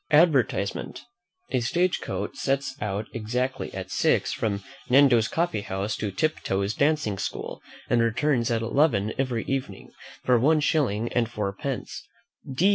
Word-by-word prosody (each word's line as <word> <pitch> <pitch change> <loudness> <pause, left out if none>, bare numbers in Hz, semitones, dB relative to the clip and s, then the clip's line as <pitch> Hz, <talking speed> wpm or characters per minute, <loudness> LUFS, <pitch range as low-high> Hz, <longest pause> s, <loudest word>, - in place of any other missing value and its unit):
ADVERTISEMENT. 150 - +2 0.5
A 130 - +2
stage 175 +10 +1
coach - - -4
sets 135 0 -1
out 105 0 -2
exactly 125 +4 -2
at - - -6
six - - +2
from 100 -3 -2 0.3
Nando's 125 -4 +6
coffee 165 -9 0
house 100 +1 -3
to 105 - -2
Mr. 95 - -23
Tiptoe's 100 -10 0
dancing 140 -9 +1
school, - - -4 0.3
and 120 - +3
returns 120 +1 +1
at 115 -1 0
eleven 115 -5 +2
every 125 -4 0
evening, 130 -8 -4 0.3
for 125 -2 +4
one 155 +6 +4
shilling 120 -8 +1
and 120 -2 +1
four 105 -4 -2
pence. 135 +5 -5
120 Hz, 140 wpm, -26 LUFS, 105-140 Hz, 0.5 s, Nando's